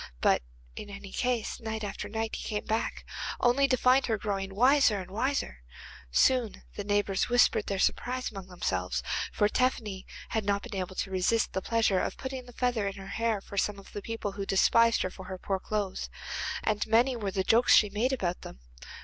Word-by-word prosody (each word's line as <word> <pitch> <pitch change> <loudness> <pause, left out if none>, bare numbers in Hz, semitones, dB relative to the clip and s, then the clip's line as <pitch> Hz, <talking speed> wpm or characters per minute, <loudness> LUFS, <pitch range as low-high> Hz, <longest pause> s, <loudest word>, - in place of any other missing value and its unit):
But - - +3 0.3
in 205 - -7
any 200 -1 -9
case, 245 -3 -1
night 220 -1 -4
after 205 0 -5
night 220 +1 -2
he - - -5
came 210 -2 -3
back, 220 +1 -2 0.3
only 260 +3 +4
to 255 -1 +2
find 255 +2 +4
her 225 -2 +1
growing 195 -2 -3
wiser 250 -2 +5
and 185 0 -8
wiser. 230 - -1 0.5
Soon 235 - +2
the 205 - -4
neighbours 205 0 +1
whispered 245 -3 +4
their 200 - -1
surprise 250 +6 0
among 195 -3 -8
themselves, 90 - -2 0.3
for 205 - +2
Tephany 215 -5 -1 0.2
had 220 - -1
not 200 0 0
been 240 -4 -7
able 185 0 -4
to 190 - -3
resist 190 +5 +1
the 190 - -1
pleasure 220 -3 +2
of - - -2
putting 260 -1 -5
the - - -11
feather 240 -5 0
in 195 - -4
her 195 0 -9
hair 225 -2 0
for 200 0 -3
some 210 +1 0
of 195 - -13
the 205 - -5
people 225 -1 -4
who 200 0 -5
despised 230 +4 +4
her 185 - -2
for 190 - -10
her 185 0 -6
poor 190 +1 -2
clothes, 205 -1 -3 0.5
and 210 -1 0
many 240 +4 +4
were 210 -4 -2
the 190 0 -1
jokes 230 +5 +5
she 210 -2 +5
made 225 +6 +1
about 180 -9 -1
them. 60 - -10
210 Hz, 200 wpm, -29 LUFS, 195-235 Hz, 0.5 s, wiser